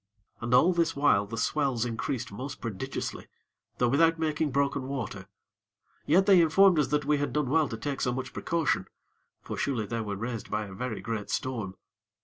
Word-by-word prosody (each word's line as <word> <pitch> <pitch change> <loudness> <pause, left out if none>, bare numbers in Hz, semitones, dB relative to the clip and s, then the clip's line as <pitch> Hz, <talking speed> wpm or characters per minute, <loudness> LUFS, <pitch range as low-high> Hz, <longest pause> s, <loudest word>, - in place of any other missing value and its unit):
And 120 0 -4
all 175 +8 +5
this 170 -1 +1
while 120 -8 +3
the 115 +2 -6
swells 130 -1 0
increased 125 +1 -3
most 135 +1 -6
prodigiously; 110 -5 -5 0.5
though 125 - +2
without 165 +6 +4
making 155 -1 0
broken 140 -1 0
water: 105 -8 -5 0.8
yet 185 +6 +5
they 190 -3 +7
informed 175 +1 +5
us 150 - +2
that 150 -1 0
we 145 0 +2
had 145 - -1
done 150 -4 -1
well 160 -1 +3
to 115 - -5
take 140 +3 -4
so 125 - +1
much 125 0 -4
precaution; 160 - 0 0.6
for - - -5
surely 120 -6 -1
they 115 +3 -3
were 105 -2 -3
raised 115 +2 -5
by 105 0 -1
a 95 - -10
very 115 +2 -4
great 110 -3 -4
storm. 115 -8 -3
130 Hz, 185 wpm, -28 LUFS, 115-150 Hz, 0.8 s, they